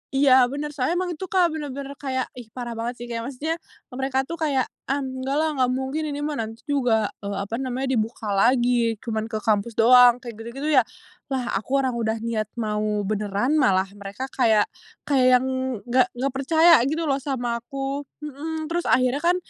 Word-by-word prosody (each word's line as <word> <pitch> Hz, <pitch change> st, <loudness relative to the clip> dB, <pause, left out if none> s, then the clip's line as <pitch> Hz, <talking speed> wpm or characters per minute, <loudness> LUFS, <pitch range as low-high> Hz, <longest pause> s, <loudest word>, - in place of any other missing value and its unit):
Iya, 275 Hz, 0 st, +4 dB, 0.2 s
bener 295 Hz, +1 st, -4 dB
soalnya 290 Hz, +3 st, -1 dB
emang 355 Hz, -, -3 dB
itu, 380 Hz, -, -3 dB
Kak, 360 Hz, -2 st, +3 dB
bener-bener 280 Hz, -3 st, -5 dB
kayak 260 Hz, -2 st, -2 dB
ih 235 Hz, -, -10 dB
parah 245 Hz, -2 st, -5 dB
banget 240 Hz, +2 st, -3 dB
sih -, -, -5 dB
kayak 230 Hz, +1 st, -3 dB
maksudnya 310 Hz, +5 st, -3 dB, 0.3 s
mereka 265 Hz, +1 st, -1 dB
tuh 335 Hz, +4 st, -7 dB
kayak, 280 Hz, -5 st, +1 dB, 0.2 s
"Ah, 275 Hz, +1 st, 0 dB
nggak 260 Hz, +1 st, -3 dB
lah 315 Hz, +1 st, +2 dB
nggak 255 Hz, -1 st, +3 dB
mungkin 270 Hz, +4 st, -2 dB
ini 290 Hz, 0 st, -4 dB
mah 295 Hz, -2 st, -2 dB
nanti 225 Hz, 0 st, -5 dB
juga, 245 Hz, -7 st, +1 dB
eee, 200 Hz, -1 st, -4 dB
apa 225 Hz, +4 st, -4 dB
namanya 260 Hz, 0 st, -2 dB
dibuka 220 Hz, -2 st, -1 dB
lagi, 240 Hz, +2 st, +3 dB
cuman 220 Hz, -2 st, -2 dB
ke 225 Hz, -, -6 dB
kampus 215 Hz, +1 st, +1 dB
doang," 245 Hz, +1 st, +7 dB
kayak 235 Hz, -3 st, -8 dB
gitu-gitu 270 Hz, +5 st, +1 dB
ya. -, -, +3 dB, 0.4 s
Lah, 260 Hz, -3 st, -2 dB
aku 255 Hz, +7 st, -3 dB
orang 260 Hz, -, +1 dB
udah 225 Hz, -2 st, -1 dB
niat 220 Hz, -2 st, -1 dB
mau 210 Hz, -2 st, -1 dB
beneran 210 Hz, +7 st, 0 dB
malah 190 Hz, -8 st, +4 dB, 0.2 s
mereka 200 Hz, +7 st, -6 dB
kayak 220 Hz, -5 st, +3 dB, 0.3 s
kayak 265 Hz, -3 st, +3 dB
yang 250 Hz, -, +2 dB, 0.4 s
nggak 245 Hz, +1 st, +3 dB
nggak 265 Hz, +3 st, -1 dB
percaya 320 Hz, +3 st, +6 dB
gitu 315 Hz, +4 st, -1 dB
loh 280 Hz, -3 st, 0 dB
sama 245 Hz, -4 st, -2 dB
aku 275 Hz, +3 st, -5 dB, 0.2 s
mhm, 310 Hz, +2 st, -5 dB
terus 345 Hz, +1 st, -1 dB
akhirnya 255 Hz, +2 st, +3 dB
kan 345 Hz, +3 st, +2 dB
260 Hz, 190 wpm, -24 LUFS, 230-285 Hz, 0.4 s, doang